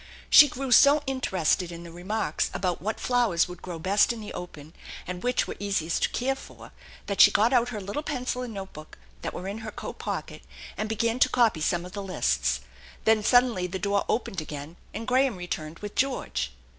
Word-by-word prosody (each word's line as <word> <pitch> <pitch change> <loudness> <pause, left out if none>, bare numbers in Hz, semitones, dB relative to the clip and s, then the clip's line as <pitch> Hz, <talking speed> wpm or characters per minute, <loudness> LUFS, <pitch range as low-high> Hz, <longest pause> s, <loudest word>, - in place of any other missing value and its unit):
She 295 - +10
grew 270 0 -5
so 285 +3 +7
interested 190 - 0
in 170 0 -8
the 170 - -10
remarks 180 0 -2
about 180 -1 -1
what 215 +4 -3
flowers 235 -10 +2
would 180 -1 -10
grow 175 -2 -6
best 195 +7 +3
in 235 - -5
the 210 -1 -8
open 155 -3 -9 0.3
and 180 0 -5
which 250 0 +1
were - - -6
easiest 190 -5 -1
to - - +2
care 265 +2 0
for 270 - -12 0.3
that 200 - +2
she - - +10
got 220 +5 +3
out 245 -1 +3
her 220 -4 -5
little 200 +9 -4
pencil 255 -4 -3
and 250 -2 -5
notebook 190 -7 -9 0.2
that - - -3
were 185 - -6
in 205 +3 -4
her 220 -1 -6
<at - - -6
pocket, - - -5 0.3
and 215 - -3
began 230 +2 0
to 255 - +5
copy 230 -10 +2
somie 175 +2 0
of 180 - -9
the 200 - -5
lists, 65 - 0 0.4
Then 220 -1 +4
suddenly 240 -6 +3
the 185 +2 -4
door 200 +1 0
opened 195 -6 -1
again, 150 +1 -8 0.2
and 225 +2 -6
Graham 255 -1 +3
returned 165 -3 -5
with 205 - -5
George. 255 - -1
200 Hz, 205 wpm, -27 LUFS, 175-245 Hz, 0.4 s, She